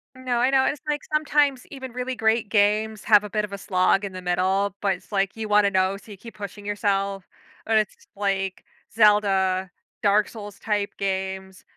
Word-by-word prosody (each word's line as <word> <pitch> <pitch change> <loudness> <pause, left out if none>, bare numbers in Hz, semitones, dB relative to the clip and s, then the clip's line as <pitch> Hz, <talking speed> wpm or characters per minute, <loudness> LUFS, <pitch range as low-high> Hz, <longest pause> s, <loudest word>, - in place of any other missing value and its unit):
No, 255 -2 -2
I 250 - +3
know, 265 -1 +3
it's, 290 - -1
like, 295 0 0
sometimes 295 -3 +2
even 265 -2 -8
really 250 +1 -3
great 220 -1 +1
games 215 0 +1
have 210 -1 +5
a 210 - -6
bit 210 +1 -1
of 200 - -12
a - - -4
slog 190 0 +2
in 200 - -4
the 185 - -7
middle, 190 +2 +1
but 200 -2 +2
it's, 185 +3 -12
like, 195 0 0
you 220 -1 -4
wanna 210 -1 +4
know, 190 0 +1
so 210 +2 -15
you 200 - -10
keep 230 +3 -12
pushing 205 0 -8
yourself. 200 -2 -1 0.4
Or 225 - +2
it's 215 -1 +1 0.2
like 195 -2 -2 0.3
Zelda, 195 -3 +3 0.3
Dark 205 0 +3
Souls-type 205 -1 -4
games- 190 -1 -3
205 Hz, 190 wpm, -24 LUFS, 195-220 Hz, 0.4 s, have